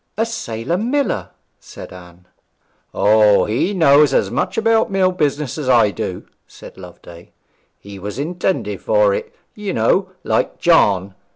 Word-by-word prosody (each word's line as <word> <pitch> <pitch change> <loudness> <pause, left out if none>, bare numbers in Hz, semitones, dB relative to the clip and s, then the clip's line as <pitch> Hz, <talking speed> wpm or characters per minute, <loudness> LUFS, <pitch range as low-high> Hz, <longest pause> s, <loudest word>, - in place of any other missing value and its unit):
'A 225 - +1
sailor 170 - -4
miller!' 255 +2 -1 0.3
said - - -12
Anne. 90 -1 -15 0.7
'O, 105 -1 +3
he 115 - -1
knows 150 -6 +4
as - - +1
much - - -2
about 225 0 +2
mill 190 -2 +1
business 150 -4 -2
as 135 -4 -3
I 115 -5 +4
do,' 90 -2 -6 0.2
said - - -14
Loveday; 85 -2 -14 0.5
'he 100 -1 -11
was 105 +4 -7
intended 175 +6 -3
for - - +2
it, 470 -1 -5 0.2
you 205 -3 -5
know, 190 0 +1
like - - -1
John. 100 - +2
150 Hz, 145 wpm, -18 LUFS, -, 0.7 s, knows